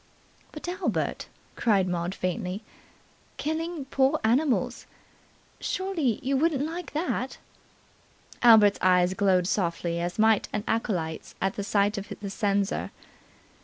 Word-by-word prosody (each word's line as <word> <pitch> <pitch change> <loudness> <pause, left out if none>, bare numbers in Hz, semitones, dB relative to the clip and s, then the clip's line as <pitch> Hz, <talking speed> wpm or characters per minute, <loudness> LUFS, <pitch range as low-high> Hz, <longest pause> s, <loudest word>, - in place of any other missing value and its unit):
"But, 305 - -8
Albert," 365 +2 -2 0.3
cried 200 -5 +2
Maud 175 +1 -2
faintly. 185 +2 -3 0.7
"Killing 315 0 -3
poor 275 +3 +2
animals. 255 +5 +1 0.7
Surely 335 - -1
you 275 +1 +1
wouldn't 290 -1 +1
like 335 +1 -6
that?" 295 -5 -2 1.0
Albert's 220 -4 +7
eyes 180 0 +4
glowed 190 -2 +2
softly, 170 -3 -1
as 175 +1 -3
might 220 -1 +3
an 210 - -2
acolyte's 175 -8 -2
at 195 0 0
the 200 - -3
sight 205 +1 +1
of 200 - -10
the 200 -1 -5
censer. 200 -1 0
"Mr. - - -31
215 Hz, 125 wpm, -27 LUFS, 190-275 Hz, 1.0 s, Albert's